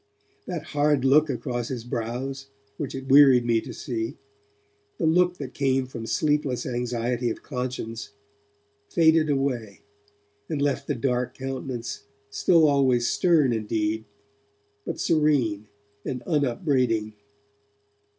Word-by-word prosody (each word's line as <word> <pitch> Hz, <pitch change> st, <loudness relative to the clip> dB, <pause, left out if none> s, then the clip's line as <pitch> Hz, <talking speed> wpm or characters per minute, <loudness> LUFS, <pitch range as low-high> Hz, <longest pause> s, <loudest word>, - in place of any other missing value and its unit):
That 175 Hz, -5 st, -4 dB
hard 145 Hz, -2 st, +2 dB
look 150 Hz, +3 st, +5 dB
across 120 Hz, -1 st, -3 dB
his 125 Hz, -3 st, -5 dB
brows, 125 Hz, +3 st, -4 dB, 0.3 s
which -, -, -4 dB
it 135 Hz, 0 st, -6 dB
wearied 135 Hz, -3 st, +7 dB
me 115 Hz, -1 st, +2 dB
to -, -, -8 dB
see, 115 Hz, -2 st, -4 dB, 0.8 s
the -, -, -1 dB
look 180 Hz, +2 st, +3 dB
that 130 Hz, -3 st, -7 dB
came 135 Hz, -2 st, +1 dB
from 115 Hz, -3 st, -7 dB
sleepless 145 Hz, 0 st, 0 dB
anxiety 120 Hz, 0 st, -1 dB
of -, -, -6 dB
conscience, 125 Hz, -4 st, -5 dB, 0.8 s
faded 160 Hz, -1 st, +4 dB
away, 130 Hz, -7 st, -1 dB, 0.7 s
and 155 Hz, -, -2 dB
left 140 Hz, -1 st, 0 dB
the 145 Hz, -, -1 dB
dark 125 Hz, 0 st, -1 dB
countenance 130 Hz, -2 st, -5 dB, 0.3 s
still 165 Hz, -4 st, +4 dB
always 130 Hz, -4 st, +3 dB
stern 160 Hz, -8 st, +3 dB
indeed, 110 Hz, 0 st, -1 dB, 0.8 s
but -, -, -4 dB
serene 135 Hz, -10 st, +1 dB, 0.4 s
and 125 Hz, -2 st, -4 dB
unupbraiding. 130 Hz, -, 0 dB
130 Hz, 120 wpm, -25 LUFS, 120-145 Hz, 0.8 s, wearied